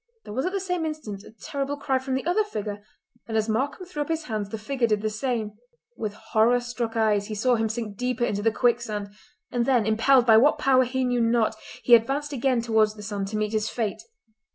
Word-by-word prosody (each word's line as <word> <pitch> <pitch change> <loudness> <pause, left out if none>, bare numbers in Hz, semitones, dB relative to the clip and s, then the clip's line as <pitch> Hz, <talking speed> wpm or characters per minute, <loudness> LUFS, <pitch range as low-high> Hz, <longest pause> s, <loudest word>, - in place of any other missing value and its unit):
There 210 - -8
was 260 +8 -1
at - - -1
the 395 - -1
same 360 -3 -2
instant 305 -11 -5
a - - -13
terrible 280 +5 -4
cry 270 -2 0
from 260 0 -3
the 265 - -3
other 360 +6 +2
figure, 210 - -5 0.4
and 220 -1 -1
as 215 0 +1
Markam 265 +11 -1
threw 345 -5 -5
up 290 - -2
his 325 -1 -1
hands 215 -6 -3
the 220 - -4
figure 240 +3 -1
did 210 -1 0
the 215 - 0
same. 220 -1 -2 0.4
With 215 -3 -4 0.2
horror 230 +3 +4
struck 240 -2 -4
eyes 210 -2 +2
he 215 - -5
saw 250 +4 +2
him 225 -2 +1
sink 220 -3 -4
deeper 250 0 0
into 205 -2 -2
the 225 +2 +2
quicksand; 225 -4 0 0.4
and 240 -1 0
then, 245 -5 +3
impelled 235 +4 +4
by 225 -2 +7
what 280 +7 +5
power 260 -1 +4
he 260 +1 -1
knew 245 -1 +1
not, 230 -1 +2 0.3
he 240 - +4
advanced 275 +6 +3
again 255 -2 +1
towards 220 -2 +2
the 210 - -10
sand 200 -1 -3
to 215 +2 -3
meet 215 0 -1
his 215 0 0
fate. 220 -4 -3
235 Hz, 230 wpm, -25 LUFS, 215-265 Hz, 0.4 s, by